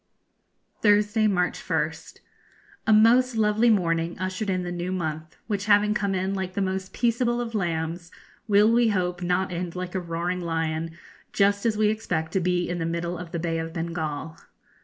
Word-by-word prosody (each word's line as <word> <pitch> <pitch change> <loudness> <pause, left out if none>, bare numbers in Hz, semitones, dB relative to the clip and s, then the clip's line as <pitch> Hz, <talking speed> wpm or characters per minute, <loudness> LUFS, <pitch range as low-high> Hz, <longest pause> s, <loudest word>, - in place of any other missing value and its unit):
Thursday, 210 +1 +3
March 180 -3 0
1st. - - -3 0.7
A - - +4
most 235 +3 +5
lovely 220 +2 +3
morning 170 -5 +1
ushered 185 +3 -3
in 185 -1 0
the 175 - -4
new 175 +1 -3
month, 160 -3 -4
which 205 -2 -2
having 210 0 +4
come 200 -2 -1
in 190 +1 -1
like 190 -1 -4
the - - -1
most 190 -1 -2
peaceable 240 0 +1
of 235 -1 -4
lambs, 170 -3 -2 0.4
will, 210 +1 +5
we 235 0 +4
hope, 180 -4 -1
not 180 +1 0
end 175 0 -4
like 180 0 -5
a 190 - 0
roaring 175 +1 -3
lion 165 -1 -2 0.4
just 200 +2 +2
as 215 -2 0
we 215 -1 +3
expect 180 -7 -2
to 190 - +1
be 175 0 0
in 175 0 -3
the - - -1
middle 170 +1 -2
of 175 -1 -8
the 170 - -2
Bay 165 0 -1
of 165 0 -5
Bengal. 165 -2 -4
185 Hz, 180 wpm, -25 LUFS, 170-210 Hz, 0.7 s, most